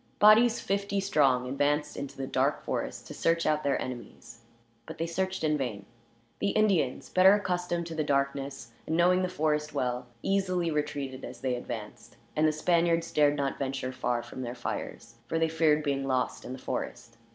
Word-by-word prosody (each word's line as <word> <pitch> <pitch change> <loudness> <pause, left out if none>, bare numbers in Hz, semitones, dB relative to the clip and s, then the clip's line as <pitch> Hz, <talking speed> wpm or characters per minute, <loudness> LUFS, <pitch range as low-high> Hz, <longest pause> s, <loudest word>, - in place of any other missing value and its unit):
Bodies, 220 +3 +6
fifty 200 0 -1
strong, 135 -10 +2
advanced 145 +3 0
into 140 - -6
the 135 - -3
dark - - 0
forest - - -3
to - - -8
search 165 0 +1
out 155 0 +2
their 140 -1 +1
enemies; 120 -1 -8 0.5
but - - -8
they 165 - -1
searched 185 +2 -2
in 150 -1 +2
vain. 110 -7 -3 0.5
The 200 - +1
Indians, 195 -12 +1
better 190 +2 +6
accustomed 180 -3 -1
to 165 - -6
the 160 -1 -1
darkness, 140 -3 -1 0.2
and 160 - 0
knowing 180 +1 +4
the 185 - 0
forest 150 -3 -1
well, 125 -2 -1 0.2
easily 185 -3 +1
retreated 145 -3 -3
as 120 -1 -8
they 130 -1 0
advanced; 115 -3 -7 0.2
and 155 +1 +4
the - - +3
Spaniards 165 +1 +1
dared 145 -2 +4
not 140 -1 -2
venture 135 -1 -2
far 125 -2 -1
from 130 - -8
their 120 0 -4
fires, 120 -1 -6
for 165 - -1
they 165 0 +2
feared 155 -2 +3
being 135 -2 -1
lost 130 -1 -1
in 125 - -5
the - - -6
forest. - - -5
150 Hz, 185 wpm, -29 LUFS, 130-170 Hz, 0.5 s, Bodies